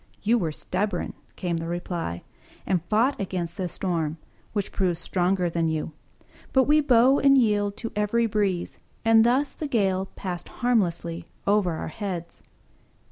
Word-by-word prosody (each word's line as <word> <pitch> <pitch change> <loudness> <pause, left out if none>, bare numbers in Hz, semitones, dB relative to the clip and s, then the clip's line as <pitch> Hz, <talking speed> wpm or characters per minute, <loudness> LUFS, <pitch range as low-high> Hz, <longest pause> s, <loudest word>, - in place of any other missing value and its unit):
"You 230 +3 +3
were 165 -6 -1
stubborn," 185 +4 -2 0.2
came 175 -2 -2
the 165 0 -4
reply, 170 - -4 0.4
"and 180 -3 +1
fought 230 +4 +2
against 180 -3 -3
the 185 - -1
storm, 165 -3 -2 0.3
which 205 -3 -2
proved 180 -4 0
stronger 180 +1 +1
than 165 -1 0
you: 160 0 -2 0.6
but 265 - +5
we 300 +3 +4
bow 260 0 +5
and 275 0 +6
yield 205 -4 +2
to 230 - -5
every 210 +3 +2
breeze, 200 -5 -1 0.3
and 225 0 +6
thus 260 +4 +2
the 305 - -4
gale 195 -7 +1
passed 180 -2 -5
harmlessly 175 -8 0 0.2
over 200 -4 +2
our 160 - -4
heads." 175 -2 -5
195 Hz, 150 wpm, -25 LUFS, 175-225 Hz, 0.6 s, and